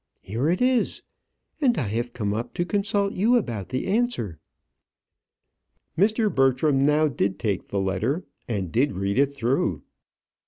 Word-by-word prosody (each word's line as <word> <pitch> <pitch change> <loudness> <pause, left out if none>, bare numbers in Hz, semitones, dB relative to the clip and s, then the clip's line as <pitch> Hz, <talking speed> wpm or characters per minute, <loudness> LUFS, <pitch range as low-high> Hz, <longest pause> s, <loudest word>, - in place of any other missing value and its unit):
"Here 115 - -1
it 180 +7 +1
is; 255 -2 +1 0.6
and 250 -5 +3
I 120 - -1
have 120 +3 -2
come 105 -4 -2
up 120 +3 -4
to 175 - 0
consult 200 +1 0
you 225 +6 +3
about 115 - -1
the 130 0 -2
answer." 195 - -1 1.6
Mr. 215 +4 +2
Bertram 135 +1 +3
now 150 +2 +4
did 100 -8 -1
take 100 -4 -2
the 100 - -2
letter, 105 - -1 0.2
and 95 -7 -2
did 135 +5 +2
read 100 +4 -1
it 140 0 +3
through. 135 -1 0
135 Hz, 150 wpm, -25 LUFS, -, 1.6 s, now